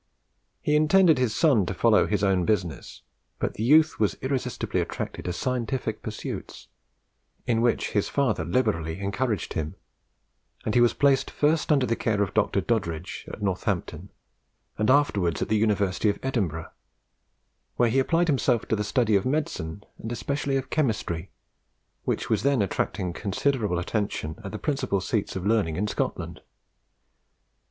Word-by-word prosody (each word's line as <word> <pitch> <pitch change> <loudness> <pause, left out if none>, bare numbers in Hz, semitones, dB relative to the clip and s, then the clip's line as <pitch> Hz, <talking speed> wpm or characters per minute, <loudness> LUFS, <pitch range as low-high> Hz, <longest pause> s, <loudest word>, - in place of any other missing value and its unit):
He 150 - +2
intended 160 0 +5
his 125 -4 +1
son 130 - +3
to 95 - -3
follow 110 +2 +4
his 105 -1 0
own 95 -2 +3
business, 90 -4 -2 0.3
but - - -2
the - - -7
youth 155 +6 +4
was 105 -2 +2
irresistibly 130 -2 -1
attracted - - -5
to 90 - -1
scientific 120 +1 -2
pursuits, 110 -1 -7 0.8
in 115 -1 +1
which 120 0 +1
his 105 - 0
father 125 - +1
liberally 85 -4 0
encouraged 105 +1 -2
him; 80 -1 -3 0.9
and 110 - 0
he 120 - +5
was 120 - +4
placed 140 -2 +3
first 155 +2 +1
under 140 -4 +4
the 115 -1 0
care 105 -3 +1
of 100 0 -4
Dr. 100 -2 +2
Doddridge, 90 -8 -2
at 105 - -8
Northampton, 95 -2 -2 0.7
and 110 +2 0
afterwards 105 - +2
at - - -6
the 110 - +3
University 105 -2 +1
of 100 - 0
Edinburgh, 95 - -2 1.0
where 120 -1 +3
he 135 - +3
applied 165 +6 +2
himself 130 -6 +2
to - - +2
the 105 - -1
study 105 0 +2
of 95 - +3
medicine, 115 - -2 0.2
and 115 - -6
especially 140 +3 -1
of 130 -1 -5
chemistry, 110 - -1 0.8
which - - -1
was - - +1
then 135 -5 +2
attracting 90 -2 -2
considerable 105 0 0
attention 90 -4 -2
at 95 - -6
the 110 - -4
principal 135 -7 -1
seats 100 +2 -2
of 95 -1 -4
learning 105 -7 +2
in 100 +5 0
Scotland. - - -3
110 Hz, 155 wpm, -26 LUFS, 95-130 Hz, 1.0 s, intended